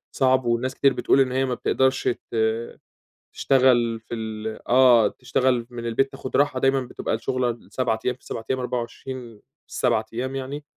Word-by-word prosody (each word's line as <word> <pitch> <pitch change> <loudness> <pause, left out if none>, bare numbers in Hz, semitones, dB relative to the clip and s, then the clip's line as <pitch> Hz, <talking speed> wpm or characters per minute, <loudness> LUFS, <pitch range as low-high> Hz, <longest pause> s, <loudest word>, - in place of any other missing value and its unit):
صعب، 130 -1 +3
وناس 120 +2 0
كتير 140 -1 +3
بتقول - - +2
إن 130 -1 +1
هي 130 +1 +1
ما 130 - -2
بتقدرش 130 +2 +1 0.2
ت - - -5 1.0
تشتغل 120 -4 +3
في 110 - -8
ال 110 -1 -5
آه، 125 -2 +6
تشتغل 125 -2 0
من 120 -1 -6
البيت، 135 +4 +1
تاخد 135 -1 -4
راحة، 145 -2 +2
دايمًا 135 +1 +3
بتبقى 125 - -4
الشغلة 125 +2 -1
ال7 120 0 -2
أيام 125 - +1
في 130 - -27
ال7 115 - -6
أيام، 130 0 0
24 125 -1 -5 0.3
في - - -21
ال7 115 -3 +1
أيام 130 +3 -3
يعني، 135 +2 -5
125 Hz, 175 wpm, -24 LUFS, 115-130 Hz, 1.0 s, آه